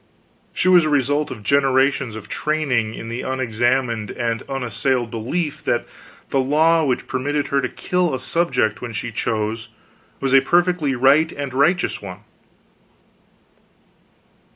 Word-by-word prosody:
She - - -1
was 180 -2 +6
a - - 0
result 145 +1 +1
of 105 - -8
generations 135 -1 +2
of 110 - -9
training 135 -8 -1
in 115 - -7
the 115 +2 -4
unexamined 120 -2 -1
and 115 -1 -2
unassailed 125 -2 -1
belief 140 +8 -3
that - - 0 0.5
the 135 - +2
law 160 +5 +3
which 130 -4 -1
permitted 145 +3 -2
her 140 0 +1
to 130 - -2
kill 180 -2 -1
a - - -4
subject 130 -6 0
when 120 -2 -6
she 115 +2 -4
chose 110 +1 -2 0.5
was 135 -1 -1
a 135 - +7
perfectly 175 -2 +1
right 140 +6 +4
and 140 -2 -5
righteous 175 +7 +1
one. 95 -1 -9
135 Hz, 140 wpm, -21 LUFS, 115-150 Hz, 0.5 s, a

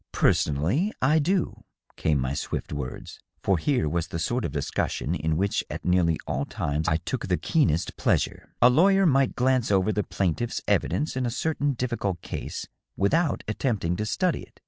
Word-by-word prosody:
" - - -61
Personally 90 - +2
I 150 +5 +4
do," 180 +4 0 0.3
came 75 -2 +1
my 65 +1 -1
swift 70 - -4
words, 65 -3 -6 0.2
for 95 -4 +2
here 130 - +1
was 80 +1 -1
the 90 - -4
sort 120 +8 -1
of - - -3
discussion 70 -1 -2
in 80 +1 -1
which 100 +3 0
at - - -6
nearly 90 -3 +3
all 70 - -1
times 75 +2 -2
I 80 - +3
took 95 +7 -4
the 90 -2 +1
keenest 130 - +1
pleasure. - - -1
" - - -46
A 120 - +9
lawyer 195 +7 +5
might 135 -5 +3
glance 130 -1 +2
over 100 +1 +3
the 105 - 0
plaintiff's 100 +5 -1
evidence 150 - +1
in 130 -1 0
a - - 0
certain 145 +3 0
difficult 120 -7 -2
case, - - -5 0.3
without 155 - +1
attempting 105 -6 -1
to 105 - -2
study 180 - 0
it. - - -16
105 Hz, 185 wpm, -26 LUFS, 80-135 Hz, 0.3 s, A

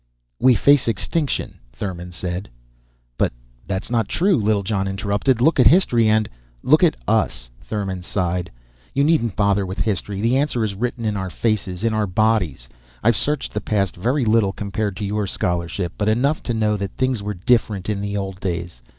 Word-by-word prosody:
"We 130 -2 +5
face 140 +4 +4
extinction," 135 - -1
Thurmon 90 +5 -6
said. 90 +2 -4 0.7
"But - - +2 0.4
that's 95 +3 -3
not 115 -3 +1
true," 190 +2 +2
Littlejohn 105 -3 0
interrupted. 100 +5 0
"Look 160 +6 +3
at - - +8
history 120 - +4
and 110 0 +3 0.2
" - - -33
"Look - - +6
at - - +4
us." - - 0
Thurmon 95 -4 -3
sighed. 90 -1 -1 0.5
"You 140 - +3
needn't 145 - +2
bother 100 -1 +2
with 95 0 -5
history. 100 -1 -1
The 115 +5 +2
answer 135 -5 0
is 105 -2 -1
written 120 +3 -3
in 105 -1 0
our 95 -1 -3
faces, 100 -2 -2
in 115 -1 +1
our 110 -1 +1
own - - -7
bodies. 95 - +1 0.4
I've 115 +1 +4
searched 150 +6 -1
the 105 - -2
past 100 -4 0
very 125 +8 0
little, 110 -3 +3
compared 100 0 -3
to 105 - -3
your 105 0 -1
scholarship, 85 0 -2
but 105 0 +2
enough 135 +8 +1
to - - +2
know 105 -1 +1
that 100 -1 -5
things 130 -4 0
were 105 0 -4
different 105 -1 +1
in 105 -2 -1
the 100 0 -2
old 95 -1 -4
days. 85 -8 -4
105 Hz, 185 wpm, -21 LUFS, 95-115 Hz, 0.7 s, at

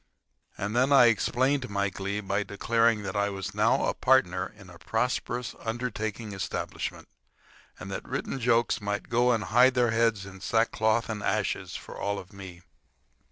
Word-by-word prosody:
And 105 +3 -3
then 130 +3 +3
I 135 -3 +8
explained 130 +3 0
my 100 0 0
glee 100 +2 -3
by 100 0 -1
declaring 115 +2 +1
that 95 0 -5
I 100 0 +1
was 95 -1 -5
now - - +2
a - - 0
partner 95 -9 +2
in 100 -3 -14
a 85 - -14
prosperous 120 +4 -2
undertaking 110 -2 -4
establishment, 95 - -4 0.7
and - - -8
that - - -6
written 135 - -3
jokes 120 -2 +2
might 105 0 -3
go 120 0 +3
hide 125 +4 +4
their 120 -2 +3
heads 115 -3 +1
in 95 -1 -11
sackcloth 110 +1 +1
and 110 -3 -4
ashes 100 0 -1
for - - -8
all 100 -2 -2
me. 95 -3 -11
110 Hz, 160 wpm, -28 LUFS, 100-120 Hz, 0.7 s, I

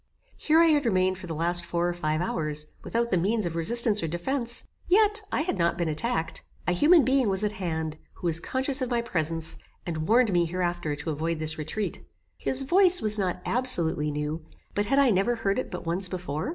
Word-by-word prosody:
Here 310 +1 +2
I 335 - +6
had 290 -4 +2
remained 185 -2 0
for 185 - -10
the 165 - -5
last 170 +2 0
four 170 0 -2
or 175 - -2
five 155 -2 -2
hours, 150 -3 -2 0.2
without 235 +1 -2
the 185 - +2
means 210 +4 0
of 170 -1 -4
resistance 210 +5 +6
or 165 - -2
defence, 235 - -3 0.2
yet 420 +3 +3
I - - 0
had 310 - -3
not 170 0 0
been 170 - -2
attacked. 160 0 -3 0.3
A - - +2
human 300 - +4
being 260 -3 +2
was 190 +1 -1
at 210 - 0
hand, 160 -5 -5
who - - -11
was 165 -1 +4
conscious 260 - 0
of 255 - -2
my 240 -1 -1
presence, 165 -6 -3 0.3
and 160 -2 -4
warned 230 -1 +3
me 175 -1 +2
hereafter 175 -3 -3
to 150 +2 -5
avoid 160 +2 -3
this 155 0 -1
retreat. 160 +8 -5 0.3
His 265 +1 0
voice 365 +5 +4
was 215 -4 +3
not 180 -2 -3
absolutely 170 -12 +5
new, 150 +2 -4 0.3
but 205 0 -2
had 275 - +1
I 275 -3 +4
never 200 +5 +1
heard 205 -1 -1
it - - -5
but 180 - -8
once 180 +3 0
before? 175 - -5
185 Hz, 215 wpm, -26 LUFS, 165-240 Hz, 0.3 s, I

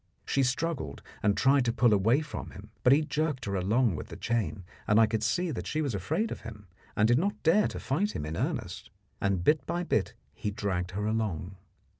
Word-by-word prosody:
She 135 - +1
struggled 130 - -1 0.2
and 100 -1 +2
tried 135 0 +4
to 115 - +2
pull 120 -1 +3
away 110 +8 +3
from 150 - -6
him, 105 +3 -12
but 125 - +5
he 145 +3 +5
jerked 150 -3 -1
her 100 - -3
along 100 +3 +2
with - - -6
the - - -9
chain, 115 -4 -1 0.2
and 105 +1 +5
I 115 - +7
could 110 0 -1
see 175 +9 0
that 130 - -5
she 155 - -1
was 145 -6 -1
afraid 100 - -1
of - - -5
him, 105 -2 -9 0.3
and 105 - +4
did 120 +3 +4
not 200 +4 -2
dare 195 +6 +4
to - - -6
fight 195 +10 -1
him - - -3
in 80 +1 -4
earnest, 115 - -3 0.3
and 100 -3 +1
bit 150 - +3
by 175 +1 -1
bit 110 - 0 0.2
he 105 - -3
dragged 95 -4 -2
her 105 - -1
along. 100 -5 -2
115 Hz, 220 wpm, -29 LUFS, 100-145 Hz, 0.3 s, I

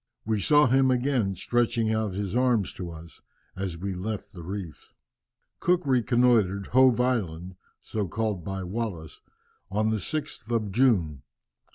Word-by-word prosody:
We 110 -1 0
saw 150 +7 +5
him 130 +1 +4
again, 125 -6 +1
stretching 115 +2 0
out 110 -4 -1
his 100 +1 -3
arms 125 -6 +2
to 90 -2 -6
us, 80 0 -12 0.3
as 95 -3 -4
we 95 +3 -4
left 100 +3 -5
the 90 - -9
reefs." 90 -2 -7 0.7
Cook 180 -1 +1
reconnoitred 120 -6 +2
Hove 130 -2 +5
Island 95 -9 -1 0.3
(so 105 -3 -3
called 105 -2 -2
by 95 +2 -4
Wallis) 90 -5 -5 0.5
on 110 +2 +1
the 110 - +1
6th 150 - -4
of 110 -4 -1
June. 95 - +2
110 Hz, 145 wpm, -26 LUFS, 95-120 Hz, 0.7 s, saw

